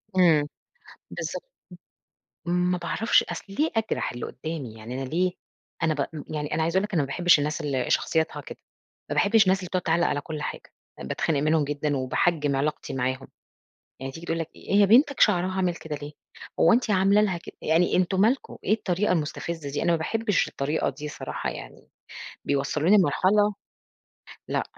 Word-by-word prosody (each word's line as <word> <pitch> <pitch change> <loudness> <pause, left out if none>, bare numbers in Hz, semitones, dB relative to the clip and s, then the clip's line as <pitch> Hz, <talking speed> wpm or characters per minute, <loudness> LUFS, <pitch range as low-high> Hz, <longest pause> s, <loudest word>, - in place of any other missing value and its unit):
امم 160 -5 +5 0.6
بالضبط - - -5 1.0
ما 180 +1 +1
باعرفش 190 +6 +2
أصْل - - -6
ليه 315 +2 +2
أجرَح 220 - -1
اللي 120 - -5
قُدّامي؟ 140 -5 -6
يعني 110 +2 -8
أنا 130 - -5
ليه، 180 +5 +1 0.5
أنا 160 -1 +2
ب 145 -2 -1 0.3
يعني 150 0 -2
أنا 160 - 0
عايزة 165 +3 0
أقول 190 - +4
لِك 210 - -6
أنا 160 - +3
ما 140 - -2
باحبش 175 +4 +4
الناس 150 +3 -2
اللي 135 -5 -2
شخصيتها 160 -1 +1
كده، - - -10 0.5
ما - - 0
باحبش 220 +2 +4
الناس 190 0 +3
اللي 185 - -6
بتقعُد 185 0 -1
تعلّق 170 0 +2
على 145 - -1
كل 150 0 -6
حاجة، - - -6 0.3
باتخنق 150 -4 -1
منهم 155 0 +2
جدًا 145 0 -1
وباحجم 145 +2 +1
علاقتي 150 +2 -2
معاهم، 130 +1 -2 0.7
يعني 135 0 -5
تيجي 165 +3 -10
تقول 165 - -1
لك 165 0 -4
"هي 200 0 +3
بنتك 270 +7 +4
شعرها 185 -3 +4
عامل 180 -2 +1
كده 160 -2 -6
ليه؟" 145 +1 -8 0.5
هو 165 - +6
أنتِ 240 -1 +2
عاملة 195 +1 +4
لها 190 -5 +1
كد 170 - -11
يعني، 165 +3 +2
أنتم 185 +1 +1
مالكم، 240 +6 +1
إيه - - +1
الطريقة 195 -2 0
المستفزِّة 160 -1 -3
دي، 145 - -2
أنا 170 - +3
ما - - +3
باحبش 215 +4 0
الطريقة 145 +3 -1
دي 150 0 -8
الصراحة 145 - -4
يعني، - - -10 0.6
بيوصلّوني 145 +7 +2
لمرحلة، 205 +4 +3 0.9
لأ - - 0
165 Hz, 175 wpm, -26 LUFS, 145-190 Hz, 1.0 s, هو